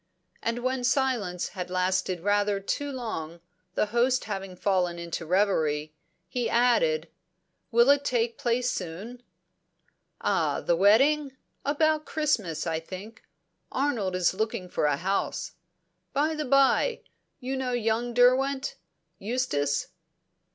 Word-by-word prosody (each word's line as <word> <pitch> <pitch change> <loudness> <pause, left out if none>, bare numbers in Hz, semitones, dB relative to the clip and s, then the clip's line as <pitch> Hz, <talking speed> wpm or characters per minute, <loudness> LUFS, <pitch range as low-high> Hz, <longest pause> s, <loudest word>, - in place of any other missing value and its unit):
And 235 +1 -2
when 255 0 -1
silence 240 -9 0
had 180 -1 -6
lasted 185 -1 0
rather 205 +1 +1
too 285 +8 -3
long, 175 - -5 0.4
the - - +2
host 250 +2 +3
having 195 -3 -5
fallen 180 -2 0
into 170 -1 -5
reverie, 155 -5 +1 0.3
he 240 +6 -2
added: 250 - +3 0.6
"Will 235 +1 +5
it 285 0 +3
take 235 -4 0
place 245 +1 +1
soon?" 195 +8 -6 1.0
"Ah - - +1
the 170 - +1
wedding? 265 - +4 0.3
About 305 +1 +1
Christmas, 215 - -1
I 160 -1 -1
think. 195 +7 -9 0.5
Arnold 240 -9 0
is 185 -1 +2
looking 190 -3 -3
for 155 - 0
a 145 -1 +1
house. 195 +5 -2 0.6
By 300 +3 +1
the 305 -1 -3
bye, 275 - +3 0.4
you 260 0 -3
know 260 -1 -2
young 235 0 0
Derwent 265 +2 +3 0.4
Eustace?" 190 - -1
225 Hz, 125 wpm, -27 LUFS, 185-260 Hz, 1.0 s, Will